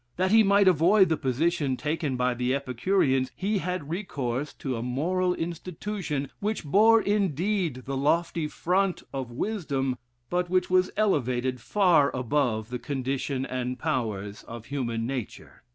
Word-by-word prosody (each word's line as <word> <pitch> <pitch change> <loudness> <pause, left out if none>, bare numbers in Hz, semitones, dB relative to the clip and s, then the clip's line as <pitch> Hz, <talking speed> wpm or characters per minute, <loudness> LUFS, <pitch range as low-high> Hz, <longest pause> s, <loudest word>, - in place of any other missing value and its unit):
That 185 +1 +1
he 225 +1 +7
might 200 -1 +4
avoid 185 +3 +5
the 160 - +2
position 140 0 0
taken 150 -3 -2
by 125 0 +1
the 125 +2 0
Epicureans, 135 0 +1
he 205 +2 0
had 180 -5 -4
recourse 145 - -3
to 130 -3 -4
a 115 - -4
moral 180 +9 0
institution, 170 -3 -4
which 210 -4 -2
bore 220 +9 +5
indeed 190 - 0
the 135 - -3
lofty 165 +3 +1
front 185 +4 0
of 135 -3 -4
wisdom, 135 - -2 0.3
but 175 +2 -1
which 180 0 +1
was 185 0 +4
elevated 130 - 0
far 175 - +3
above 125 -4 0
the 125 - -3
condition 135 +1 -2
and 125 -1 -3
powers 110 -10 -3
of 115 -1 -9
human 115 -5 -2
nature. 125 -3 -6
150 Hz, 145 wpm, -27 LUFS, 130-185 Hz, 0.3 s, he